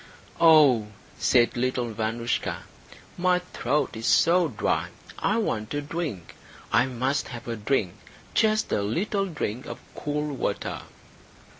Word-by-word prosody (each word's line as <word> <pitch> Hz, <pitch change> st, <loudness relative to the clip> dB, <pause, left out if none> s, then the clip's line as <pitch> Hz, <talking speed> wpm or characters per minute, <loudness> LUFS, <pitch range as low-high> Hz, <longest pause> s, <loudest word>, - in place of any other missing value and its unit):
"Oh," 150 Hz, -9 st, +6 dB, 0.3 s
said 120 Hz, -2 st, +3 dB
little 125 Hz, -1 st, -1 dB
Vanoushka, 115 Hz, +2 st, -2 dB, 0.6 s
"my 180 Hz, 0 st, +3 dB
throat 150 Hz, -6 st, -1 dB
is 110 Hz, +1 st, -3 dB
so 175 Hz, +1 st, +4 dB
dry. 110 Hz, -8 st, -1 dB, 0.3 s
I 210 Hz, -, +1 dB
want 115 Hz, -, -2 dB
a 145 Hz, -, -1 dB
drink. 145 Hz, -, -5 dB, 0.4 s
I 130 Hz, -, +4 dB
must 130 Hz, +3 st, -1 dB
have 120 Hz, -1 st, -8 dB
a 115 Hz, -, -2 dB
drink 105 Hz, -4 st, 0 dB, 0.4 s
just 215 Hz, -1 st, +2 dB
a -, -, +1 dB
little 195 Hz, -, -1 dB
drink 130 Hz, -, -4 dB
of -, -, -6 dB, 0.2 s
cool 150 Hz, 0 st, -3 dB
water." -, -, -3 dB
135 Hz, 130 wpm, -26 LUFS, 115-165 Hz, 0.6 s, Oh